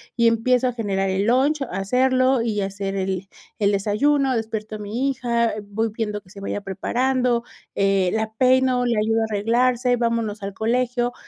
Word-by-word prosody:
y 235 Hz, -1 st, +3 dB
empiezo 245 Hz, +2 st, +2 dB
a 250 Hz, -, -1 dB
generar 195 Hz, -4 st, -1 dB
el 190 Hz, +1 st, 0 dB
lunch, 270 Hz, +6 st, +2 dB
a -, -, -3 dB
hacerlo, 255 Hz, +5 st, +2 dB
y 220 Hz, -3 st, -1 dB
hacer 195 Hz, 0 st, -3 dB
el 190 Hz, 0 st, -2 dB, 0.3 s
el 205 Hz, -1 st, +2 dB
desayuno, 260 Hz, +7 st, +1 dB
despierto 220 Hz, -1 st, -4 dB
a -, -, -7 dB
mi 225 Hz, +7 st, -2 dB
hija, 235 Hz, -3 st, 0 dB
voy 215 Hz, +3 st, -2 dB
viendo 210 Hz, -2 st, -3 dB
que 185 Hz, -, -23 dB
se 200 Hz, -, -12 dB
vaya 200 Hz, +1 st, -3 dB
preparando, 245 Hz, +5 st, 0 dB, 0.3 s
eh, 195 Hz, -2 st, +2 dB
la 220 Hz, 0 st, -2 dB
peino, 255 Hz, +1 st, +3 dB
le 235 Hz, -2 st, +1 dB
ayudo 225 Hz, +1 st, +1 dB
a -, -, +2 dB
arreglarse, 240 Hz, +4 st, +2 dB
vámonos 230 Hz, -3 st, -1 dB
al 195 Hz, 0 st, -4 dB
colegio, 245 Hz, +3 st, 0 dB
225 Hz, 175 wpm, -22 LUFS, 205-250 Hz, 0.3 s, y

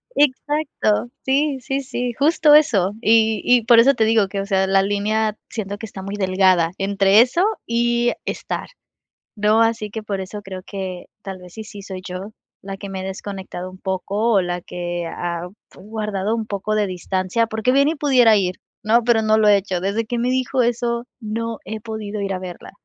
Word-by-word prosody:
Exacto. 285 Hz, -5 st, +1 dB, 0.2 s
Sí, 275 Hz, 0 st, +1 dB
sí, 270 Hz, +3 st, -2 dB
sí, 245 Hz, -2 st, -3 dB
justo 300 Hz, +2 st, +4 dB
eso, 205 Hz, -10 st, +4 dB
y 220 Hz, -1 st, +3 dB
y 245 Hz, -2 st, +4 dB
por 235 Hz, -1 st, +7 dB
eso 275 Hz, +4 st, +6 dB
te 225 Hz, -3 st, +1 dB
digo 220 Hz, -3 st, +3 dB
que 195 Hz, 0 st, -4 dB
o -, -, -4 dB
sea, 190 Hz, -1 st, +1 dB
la 195 Hz, 0 st, +3 dB
línea, 210 Hz, +2 st, 0 dB
siento 205 Hz, -2 st, -5 dB
que 225 Hz, -, -7 dB
está 195 Hz, -2 st, -9 dB
muy 200 Hz, +1 st, -5 dB
delgada 185 Hz, -3 st, +3 dB
entre 195 Hz, +2 st, +4 dB
eso 260 Hz, +9 st, +2 dB, 0.2 s
y 240 Hz, +1 st, +1 dB
estar, -, -, -4 dB, 0.7 s
¿no?, 210 Hz, +2 st, +3 dB
así 225 Hz, -2 st, +1 dB
que 220 Hz, +1 st, -6 dB
por 200 Hz, -2 st, -3 dB
eso 205 Hz, +2 st, -7 dB
creo 190 Hz, -1 st, -8 dB
que 190 Hz, -3 st, -6 dB, 0.2 s
tal 190 Hz, -2 st, -7 dB
vez 180 Hz, -1 st, -14 dB
si 220 Hz, -, -7 dB
sí 205 Hz, -1 st, -10 dB
soy 190 Hz, -1 st, -7 dB
yo 185 Hz, +3 st, -6 dB, 0.3 s
la 195 Hz, 0 st, -6 dB
que 200 Hz, 0 st, -8 dB
me 190 Hz, -1 st, -5 dB
he -, -, -6 dB
desconectado 190 Hz, -2 st, -6 dB
un 185 Hz, -, -13 dB
poco, 200 Hz, +5 st, -1 dB
o 195 Hz, -, +4 dB
la 175 Hz, 0 st, -3 dB
que 175 Hz, -1 st, -4 dB
ha 170 Hz, +1 st, -4 dB, 0.3 s
guardado 210 Hz, +1 st, -3 dB
un 225 Hz, -1 st, -3 dB
poco 210 Hz, +1 st, -2 dB
de 210 Hz, -2 st, +1 dB
distancia 185 Hz, +4 st, -1 dB
porque 220 Hz, +3 st, 0 dB
bien 280 Hz, +1 st, +4 dB
y 325 Hz, -, -1 dB
pudiera 255 Hz, -6 st, +5 dB
ir, 185 Hz, -1 st, 0 dB, 0.3 s
¿no?, 230 Hz, +2 st, +3 dB
pero 230 Hz, -1 st, +3 dB
no 215 Hz, 0 st, +3 dB
lo 215 Hz, -, +4 dB
he 205 Hz, -1 st, +7 dB
hecho. 190 Hz, -2 st, -2 dB
Desde 205 Hz, +4 st, -1 dB
que 240 Hz, +1 st, -3 dB
me 245 Hz, -, 0 dB
dijo 255 Hz, 0 st, +1 dB
eso, 235 Hz, 0 st, 0 dB
no 225 Hz, +1 st, -4 dB
he 220 Hz, +2 st, -5 dB
podido 215 Hz, -2 st, -5 dB
ir 195 Hz, -1 st, -2 dB
a 185 Hz, -, -3 dB
verla. 180 Hz, -2 st, -9 dB
210 Hz, 200 wpm, -21 LUFS, 190-235 Hz, 0.7 s, por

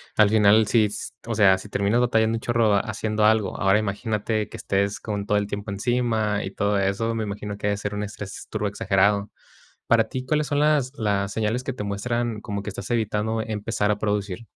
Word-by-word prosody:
al 105 Hz, -2 st, +5 dB
final, 105 Hz, 0 st, +5 dB
sí, 110 Hz, -3 st, +3 dB, 0.4 s
o 115 Hz, -, -3 dB
sea, 100 Hz, -4 st, +5 dB
si 105 Hz, -, -11 dB
terminas 100 Hz, +4 st, +1 dB
batallando 115 Hz, -2 st, +2 dB
un -, -, -2 dB
chorro 115 Hz, -3 st, +2 dB
haciendo 110 Hz, 0 st, 0 dB
algo, 110 Hz, -1 st, +2 dB
ahora 95 Hz, +2 st, +4 dB
imagínate 105 Hz, +1 st, -2 dB
que -, -, -9 dB
estés 100 Hz, +1 st, -1 dB
con 105 Hz, -2 st, -4 dB
todo 105 Hz, 0 st, +2 dB
el 100 Hz, -, -3 dB
tiempo 100 Hz, 0 st, -5 dB
encima 110 Hz, -1 st, 0 dB
y 95 Hz, -, -5 dB
todo 100 Hz, 0 st, 0 dB
eso, 100 Hz, +4 st, 0 dB
me 110 Hz, -, -1 dB
imagino 105 Hz, 0 st, -5 dB
que -, -, -6 dB
debe 100 Hz, -1 st, +1 dB
ser 105 Hz, 0 st, -4 dB
un 105 Hz, -, -2 dB
estrés 100 Hz, -1 st, -8 dB
turbo 105 Hz, -1 st, -1 dB
exagerado. 100 Hz, +1 st, +1 dB, 0.6 s
Para 115 Hz, -1 st, +4 dB
ti, 130 Hz, -1 st, -4 dB
¿cuáles 150 Hz, +2 st, +1 dB
son 145 Hz, 0 st, 0 dB
las 150 Hz, -4 st, +2 dB
las 100 Hz, -2 st, -1 dB
señales 110 Hz, +3 st, -1 dB
que 135 Hz, -, -3 dB
te 105 Hz, -, -5 dB
muestran 110 Hz, +2 st, -2 dB
como 100 Hz, -1 st, -4 dB
que 105 Hz, -, -4 dB
estás 105 Hz, -, -7 dB
evitando 110 Hz, 0 st, 0 dB
empezar 105 Hz, -1 st, -2 dB
a 105 Hz, -, 0 dB
producir? 105 Hz, +1 st, -2 dB
105 Hz, 205 wpm, -24 LUFS, 100-115 Hz, 0.6 s, al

